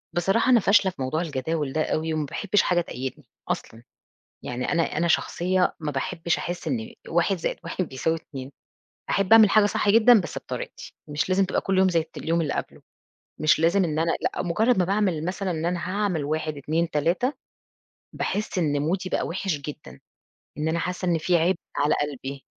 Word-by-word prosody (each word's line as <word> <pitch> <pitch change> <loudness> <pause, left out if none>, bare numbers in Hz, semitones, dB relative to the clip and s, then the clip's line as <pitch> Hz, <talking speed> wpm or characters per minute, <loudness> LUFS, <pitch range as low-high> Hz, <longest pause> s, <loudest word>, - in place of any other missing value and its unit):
بصراحة 195 +8 +2
أنا 245 -2 +7
فاشلة 200 -1 +4
في 155 - -11
موضوع 130 +5 -1
الجداول 150 -2 -2
ده 155 - +1
أوي، 160 +1 -1
وما 155 -1 -1
باحبش 205 +7 +1
حاجة 175 -1 +2
تقيدني، 130 -5 -6 0.2
أصلًا 115 +1 -4 0.6
يعني 125 +1 -3
أنا 170 -3 0
أنا 170 +2 +2
شخصيّة 180 +2 +1
ما 155 -2 -3
باحبش 165 +3 -1
أحس 175 -1 -5
إن 120 -7 -3
1 175 +3 +1
زائد 165 - -2
1 185 - -2
بيساوي 145 +5 -1
2 135 -4 -8 0.6
أحب 195 +1 +1
أعمل 220 -2 +8
حاجة 215 -1 +5
صح 205 - -1
جدًا 225 +2 +7
بس 170 - -5
بطريقتي، - - -7
مش 150 +3 -1
لازم 190 +1 +3
تبقى 185 - -1
كُلّ 195 -1 0
يوم 190 0 +5
زي 170 -2 +2
الت 160 0 -9
اليوم 165 +1 0
اللي 155 -3 -1
قبله، - - -5 0.6
مش 155 0 +4
لازم 170 +4 +3
إن 155 -2 -2
أنا 165 +1 +2
لأ، - - -1
مجرّد 215 +7 +2
ما 180 - +4
باعمل 190 -4 0
مثلًا 190 +2 -2
إن 165 -1 -2
أنا 175 0 -1
هاعمل 190 -6 0
1 155 +1 -2
2 160 +4 -1
3، 170 - +1 0.8
باحس 210 0 -2
إن 145 -5 +1
مودي 185 +5 -1
بقى - - -1
وِحِش 180 -1 -2
جدًا، 150 +1 -9 0.6
إن 150 +1 -1
أنا 165 +1 0
حاسّة 180 +1 -3
إن 170 -2 +2
في 175 +2 +2
عبء 175 +3 +2 0.2
على 145 +1 +3
قلبي، 140 -1 -5
170 Hz, 190 wpm, -25 LUFS, 155-190 Hz, 0.8 s, أعمل